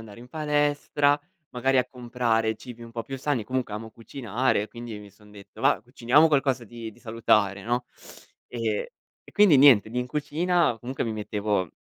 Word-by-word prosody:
andare 105 Hz, 0 st, -13 dB
in 120 Hz, -, -12 dB
palestra, 145 Hz, -1 st, +1 dB, 0.3 s
magari 130 Hz, +1 st, +1 dB
a 125 Hz, -, +2 dB
comprare 120 Hz, -3 st, -1 dB
cibi 120 Hz, -1 st, -11 dB
un 115 Hz, -, -10 dB
po' 115 Hz, -1 st, -5 dB
più 135 Hz, -, -6 dB
sani, 130 Hz, -4 st, -1 dB
comunque 130 Hz, -3 st, -3 dB
amo 110 Hz, +1 st, -6 dB
cucinare, 115 Hz, -1 st, -1 dB
quindi 120 Hz, -3 st, -8 dB
mi 105 Hz, -1 st, -12 dB
son 105 Hz, +1 st, -20 dB
detto: 100 Hz, -1 st, -14 dB
"Va -, -, +3 dB
b -, -, -26 dB
cuciniamo 135 Hz, +7 st, +4 dB
qualcosa 135 Hz, -5 st, +1 dB
di 115 Hz, 0 st, -8 dB
di -, -, -20 dB
salutare, 105 Hz, -3 st, +1 dB
no." 120 Hz, +4 st, -1 dB, 0.6 s
E 115 Hz, -3 st, -3 dB, 0.3 s
e -, -, -18 dB
quindi 205 Hz, -8 st, +6 dB
niente, 130 Hz, -6 st, +7 dB
lì 125 Hz, +2 st, -1 dB
in 125 Hz, -, -5 dB
cucina, 160 Hz, 0 st, +1 dB
comunque 130 Hz, +3 st, -3 dB
mi 115 Hz, -, -2 dB
mettevo 105 Hz, -4 st, -2 dB
120 Hz, 180 wpm, -26 LUFS, 110-135 Hz, 0.6 s, niente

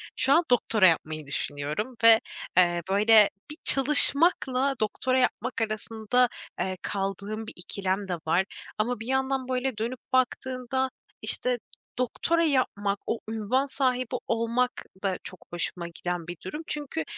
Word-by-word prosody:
şu 270 Hz, -, +2 dB
an 335 Hz, -, +4 dB
doktora 220 Hz, -5 st, +4 dB
yapmayı 155 Hz, -3 st, -1 dB
düşünüyorum 150 Hz, -, -4 dB
ve, 225 Hz, -1 st, +8 dB, 0.4 s
eee, 175 Hz, -1 st, +3 dB
böyle, 210 Hz, +2 st, +5 dB, 0.2 s
bir 300 Hz, -, -9 dB
çalışmakla 275 Hz, -1 st, +7 dB
doktora 255 Hz, +4 st, 0 dB
yapmak 250 Hz, -1 st, -1 dB
arasında, 220 Hz, +3 st, 0 dB, 0.3 s
eee, 185 Hz, 0 st, -2 dB
kaldığım 200 Hz, +2 st, -4 dB
bir -, -, -9 dB
ikilem 190 Hz, +2 st, -3 dB
de 180 Hz, -, -2 dB
var 175 Hz, +4 st, +2 dB, 0.3 s
ama 235 Hz, +2 st, -1 dB
bir 225 Hz, -, -8 dB
yandan, 265 Hz, 0 st, -1 dB
böyle, 255 Hz, -2 st, -2 dB
dönüp 235 Hz, +3 st, -4 dB
baktığında, 255 Hz, 0 st, -1 dB, 0.3 s
işte, 250 Hz, -1 st, +1 dB, 0.4 s
doktora 330 Hz, +7 st, 0 dB
yapmak, 205 Hz, -9 st, 0 dB
o 230 Hz, -, -2 dB
ünvan 225 Hz, +5 st, -1 dB
sahibi 255 Hz, -3 st, -1 dB
olmak 230 Hz, +2 st, 0 dB, 0.3 s
da 190 Hz, -2 st, -1 dB
çok 185 Hz, -, -10 dB
hoşuma 175 Hz, 0 st, -3 dB
giden 170 Hz, 0 st, -5 dB
bir 175 Hz, 0 st, -7 dB
durum. 300 Hz, -, -6 dB
Çünkü, 290 Hz, -, -3 dB
230 Hz, 135 wpm, -26 LUFS, 195-255 Hz, 0.4 s, ve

